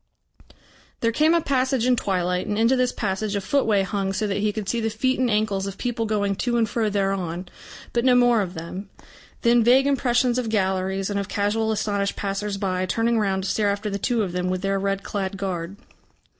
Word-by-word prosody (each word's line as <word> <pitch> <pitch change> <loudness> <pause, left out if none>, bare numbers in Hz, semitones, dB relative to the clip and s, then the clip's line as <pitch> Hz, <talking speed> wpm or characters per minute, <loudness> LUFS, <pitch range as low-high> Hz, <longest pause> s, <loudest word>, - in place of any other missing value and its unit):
There 230 - +2
came 310 +7 +3
a 335 - +3
passage 260 -3 +1
in 250 0 +4
twilight, 180 -4 -1
and 205 - -1
into 230 +4 +4
this 255 -1 +1
passage 205 0 -2
a - - +1
footway 210 -3 +2
hung 195 0 -2
so 210 +3 -1
that 200 -1 -1
he 210 +1 +1
could 210 -2 -5
see 235 +2 0
the 225 - 0
feet 255 +5 0
and 255 -1 +2
ankles 210 -2 0
of 195 0 -6
people 235 -2 -2
going 205 -2 0
to 240 -2 0
and 225 -1 +2
fro 220 -1 0
thereon, 195 -3 -2 0.5
but 235 - +1
no 255 -1 +5
more 245 -2 +4
of 185 -2 -4
them. 180 +5 -7 0.5
Then 235 -1 +5
vague 255 +4 +5
impressions 250 -3 +2
of 235 -3 -2
galleries 190 -1 0
and 200 - -1
of 200 - -3
casual 210 +3 0
astonished 205 -2 -1
passers 200 0 -3
by 185 -2 -1
turning 230 +4 +1
round 190 -2 0
to 190 - -2
stare 210 -2 +1
after 205 +1 -2
the 200 - -3
two 235 +1 +1
of 185 - -3
them 180 +1 -2
with 185 0 -2
their 195 0 0
red 195 0 -1
clad 195 -1 -3
guard. 190 -1 -4
205 Hz, 215 wpm, -23 LUFS, 195-235 Hz, 0.5 s, no